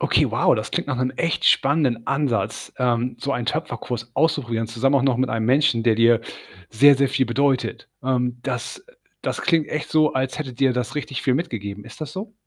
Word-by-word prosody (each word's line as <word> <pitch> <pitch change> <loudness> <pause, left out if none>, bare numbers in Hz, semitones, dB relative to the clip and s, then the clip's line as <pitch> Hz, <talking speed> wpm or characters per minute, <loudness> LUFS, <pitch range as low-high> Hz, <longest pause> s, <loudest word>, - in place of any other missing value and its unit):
Okay, - - +2
wow, - - +3
das - - -4
klingt - - -2
nach 140 -3 -2
'nem 130 +1 0
echt 165 -2 -1
spannenden 135 -5 +2
Ansatz, 135 -4 -1
ähm, 125 -1 0
so 140 +3 -2
einen 120 -3 -3
Töpferkurs 125 -6 -3
auszuprobieren, 120 -8 0
zusammen 125 +5 +1
auch 135 - +3
noch 135 -3 +2
mit 130 +1 0
einem 110 0 -1
Menschen, 130 -2 +3
der 115 -2 +3
dir 115 0 +4 0.5
sehr, 140 +6 +6
sehr 135 0 +2
viel 130 -1 +1
bedeutet. 135 +2 0
Ähm, 125 -1 -1
das, 130 - -4
äh - - -20 0.3
das - - -3
klingt 165 -3 +2
echt 155 - -4
so, 155 -1 +3
als 130 +1 -2
hätte 135 -4 -5
dir 130 +1 +2
das 125 +1 -3
richtig 145 -3 -4
viel 130 - +2
mitgegeben. 105 - -4
Ist - - -13
das 150 -1 -5
so? 205 +5 -7
130 Hz, 205 wpm, -22 LUFS, 120-145 Hz, 0.5 s, sehr